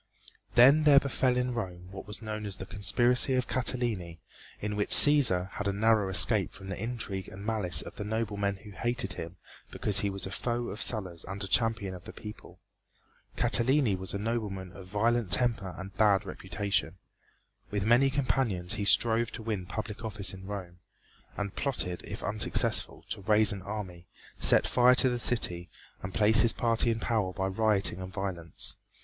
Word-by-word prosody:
Then 135 +6 +6
there 145 -2 +7
befell 130 -2 -1
in 125 0 -1
Rome 90 -6 -6
what 95 -1 -10
was 105 +1 -7
known 105 -1 -5
as 100 - -5
the 95 - -8
conspiracy 120 +6 +2
of 125 -1 -1
Catiline, 115 -10 -1 0.4
in 105 0 -4
which 105 0 -2
Cæsar 115 -12 +8
had 105 - -5
a - - +1
narrow 105 0 +1
escape 100 +1 +4
from 95 0 -10
the 95 - -6
intrigue 110 -5 -4
and 100 +2 -10
malice 100 -8 0
of - - -12
the - - -5
noblemen 105 -2 -2
who 105 +2 -14
hated 120 -2 -2
him 85 +2 -8 0.3
because 105 -2 +1
he 100 - -1
was 95 -1 -4
a 95 - -7
foe 120 +4 -3
of 105 - -7
Sulla's 95 -7 -1
and 100 +1 -7
a - - -5
champion 110 -2 0
of 90 -1 -11
the - - -10
people. 105 0 -12 0.8
Catiline 130 -3 +3
was 95 0 -4
a - - -1
nobleman 100 -4 -4
of 90 0 -12
violent 110 +2 0
temper 100 -1 +1
and 95 0 -9
bad 100 -1 +2
reputation. 95 -1 -4 0.7
With 100 -1 -3
many 120 +4 +4
companions 125 -9 -1
he 100 - -3
strove 115 +2 +3
to 110 - -7
win 105 -5 -4
public 105 +1 -6
office 105 -3 -2
in 95 0 -11
Rome, 90 -4 -8 0.6
and 100 -2 -5
plotted, 120 -10 -2
if - - -8
unsuccessful, 105 +1 -1
to - - -4
raise 105 +2 +3
an 100 -2 -6
army, 90 -4 -8 0.3
set - - +4
fire 125 +1 +4
to 130 +1 +4
the 120 -1 -3
city 90 -8 0 0.3
and 95 - -6
place 110 +2 +3
his 115 -2 +3
party 115 0 +1
in 115 -1 -1
power 110 -5 -1
by 95 +1 -3
rioting 100 -1 0
and 95 0 -8
violence. 95 -5 -5
105 Hz, 180 wpm, -28 LUFS, 95-115 Hz, 0.8 s, Cæsar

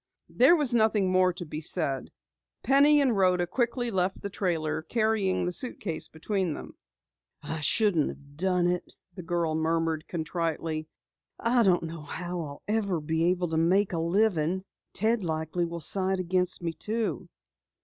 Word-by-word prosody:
There 265 +8 +5
was 290 -7 +1
nothing 215 -4 +3
more 185 0 +4
to 175 0 -6
be 155 0 -6
said. 150 -5 +1 0.5
Penny 285 +4 +5
and 260 -5 +2
Rhoda 180 -2 +3
quickly 240 +5 -1
left 190 -1 0
the 200 - -4
trailer, 160 -5 -1
carrying 215 0 0
the 180 - -1
suitcase 200 -8 -2
between 180 0 -2
them. - - -9 0.7
"I 160 - -4
shouldn't 170 +1 +3
have 140 0 -12
done 180 +1 +1
it," 180 0 +1 0.3
the 180 - -8
girl 170 -1 -1
murmured 160 0 0
contritely. 160 -1 -3 0.5
"I 235 +1 +2
don't 185 -6 +3
know 165 -1 -6
how 175 +4 -5
I'll 145 -3 -8
ever 205 -5 0
manage 160 +4 +1
to 160 - 0
make 185 +4 +2
a 165 - -1
living. 180 0 +1 0.3
Ted 220 +2 0
likely 160 +1 -1
will 170 0 -6
side 190 +4 -1
against 180 0 0
me, 165 -1 -2
too." 220 +7 -3
180 Hz, 155 wpm, -28 LUFS, 160-205 Hz, 0.7 s, There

